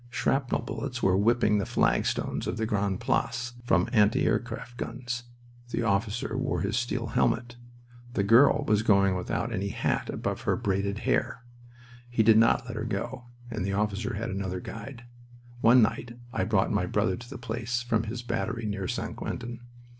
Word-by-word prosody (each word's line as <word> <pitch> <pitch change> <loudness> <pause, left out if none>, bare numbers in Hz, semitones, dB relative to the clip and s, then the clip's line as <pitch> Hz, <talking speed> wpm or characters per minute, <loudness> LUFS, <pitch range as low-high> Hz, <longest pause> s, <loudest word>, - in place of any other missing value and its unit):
Shrapnel 135 0 0
bullets 125 -3 -5
were 95 -1 +4
whipping 105 +1 +3
the 100 - -1
flagstones - - 0
of - - -2
the 110 - 0
Grande 100 -3 0
Place, 120 0 -1
from 90 -5 +3
anti 105 -1 +4
aircraft 120 0 -2
guns. 120 0 -4 0.4
The 120 - -1
officer 105 +3 0
wore 130 +1 -1
his 100 +2 -1
steel 120 -1 -1
helmet. 120 +2 +1 0.6
The 100 - +1
girl 115 +7 +5
was 105 -1 +3
going 100 -3 +4
out - - -1
without 115 +5 -2
any 100 -1 -1
hat 100 - -1
above - - -3
her - - +1
braided 100 +1 -1
hair. 115 - 0 0.7
We 110 - +6
did 110 0 +6
not 115 +1 +4
let 115 -2 -6
her 110 - -2
go, 120 +2 -4 0.3
and 110 -4 -2
the 100 +1 -1
officer 105 +3 -1
had 115 +3 -3
another 95 -1 -3
guide. 115 +5 -8 0.6
One 120 +1 +6
night 115 +2 -2 0.2
I - - 0
brought - - +2
my - - +1
brother 95 - +1
to 120 0 -11
the 135 - -7
place 115 +1 -3
from 115 -2 0
his 120 +3 -5
battery 115 0 -2
near 100 -3 -2
St. - - -3
Quentin. 120 0 -5
115 Hz, 175 wpm, -28 LUFS, 105-120 Hz, 0.7 s, We